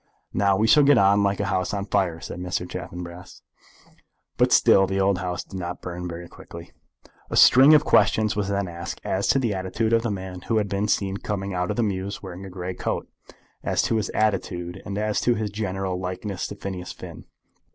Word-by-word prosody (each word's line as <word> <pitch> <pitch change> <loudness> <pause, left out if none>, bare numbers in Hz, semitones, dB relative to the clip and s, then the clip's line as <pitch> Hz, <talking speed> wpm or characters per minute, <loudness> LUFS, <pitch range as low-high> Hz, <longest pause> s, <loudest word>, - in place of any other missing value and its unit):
"Now 100 -1 +2
we 110 - +2
shall 110 +7 +6
get 140 -1 +5
on 100 0 +4
like 100 0 +1
a 100 - 0
house 95 +1 -1
on 100 -1 -3
fire," 95 -5 0
said 90 - -7
Mr. 90 0 -3
Chaffanbrass. 90 0 -8 0.9
But - - +2
still 95 0 +5
the 95 - -2 0.2
house 90 -1 -3
did 95 - -8
not 90 0 -5
burn 90 0 -5
very 85 0 -7
quickly. 85 0 -12 0.6
A - - -2
string 135 +5 +8
of 150 0 +4
questions 105 +1 +3
was 100 -2 -1
then 100 -1 -1
asked 85 0 -6
as 95 +1 -1
to - - +4
the 120 -6 0
attitude 100 +4 -1
of 115 - +4
the 115 - -2
man 95 -2 -5
who 115 - +1
had 105 -2 0
been 100 +1 -1
seen 100 -2 0
coming 100 -1 -4
out 90 0 -1
of - - -2
the 120 - +2
mews 100 -1 -3
wearing 95 0 -8
a - - -9
grey 90 0 -5
great - - -18
coat, - - -3 0.5
as - - +1
to 115 - +1
his 105 - -2
attitude, 95 -4 -1
and 100 0 -4
as 105 0 0
to 120 - +2
his 105 -2 -3
general 95 -3 -3
likeness 95 +1 -4
to - - -8
Phineas 95 -3 -6
Finn. - - -10
95 Hz, 215 wpm, -24 LUFS, 90-105 Hz, 0.9 s, string